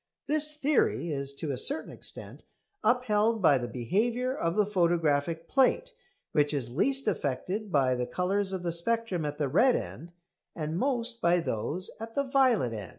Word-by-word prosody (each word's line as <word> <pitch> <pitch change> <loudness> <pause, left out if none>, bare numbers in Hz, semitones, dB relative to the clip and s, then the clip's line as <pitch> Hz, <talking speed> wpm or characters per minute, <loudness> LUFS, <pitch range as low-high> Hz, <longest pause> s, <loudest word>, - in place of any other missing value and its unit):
This 300 +1 +1
theory 280 - +1
is 140 -1 -3
to 145 +1 -4
a 130 - -3
certain 285 - -1
extent - - -7 0.4
upheld 225 -2 +2
by 150 -8 +4
the 120 - -4
behaviour 225 - -1
of 165 -6 -1
the 210 - +3
photographic 165 -4 +1
plate, 270 - +2 0.4
which 150 -1 +2
is 120 -4 -3
least 270 - +1
affected 185 - -2
by 135 -4 +3
the 125 -1 -2
colours 190 +5 -1
of 190 -2 -4
the 170 - -1
spectrum 190 -1 0
at 145 0 -4
the 150 -2 0
red 240 - +4
end 170 +2 -6 0.4
and 155 -1 -3
most 240 -3 -1
by 170 +1 +3
those 165 - -2
at 225 0 -8
the 280 - +2
violet 255 - +2
end. 105 -4 -6
180 Hz, 170 wpm, -29 LUFS, 145-235 Hz, 0.4 s, by